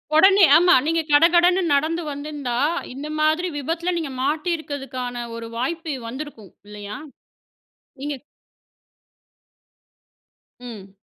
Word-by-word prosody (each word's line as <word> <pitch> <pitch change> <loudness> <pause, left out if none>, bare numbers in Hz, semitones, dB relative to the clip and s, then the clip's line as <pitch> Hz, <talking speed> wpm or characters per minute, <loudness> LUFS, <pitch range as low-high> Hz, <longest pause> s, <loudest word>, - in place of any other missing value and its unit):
உடனே 385 +4 +7
ஆமா, 355 +2 +5
நீங்க 330 +1 +1
கடகடன்னு 345 +5 +5
நடந்து 320 +4 0
வந்திருந்தா 285 -4 -4 0.4
இந்த 280 +3 -7
மாதிரி 310 +4 +2
விபத்தில 330 +5 -2
நீங்க 315 -5 -4
மாட்டியிருக்கிறதுக்கான 275 -5 -3
ஒரு 230 0 -7
வாய்ப்பு 320 +6 -3 0.2
வந்திருக்கும் 235 - -8 0.2
இல்லையா? 210 0 -8 1.0
நீங்க 290 +1 -4 2.4
ம். 215 -6 -10
295 Hz, 90 wpm, -22 LUFS, 250-330 Hz, 2.4 s, உடனே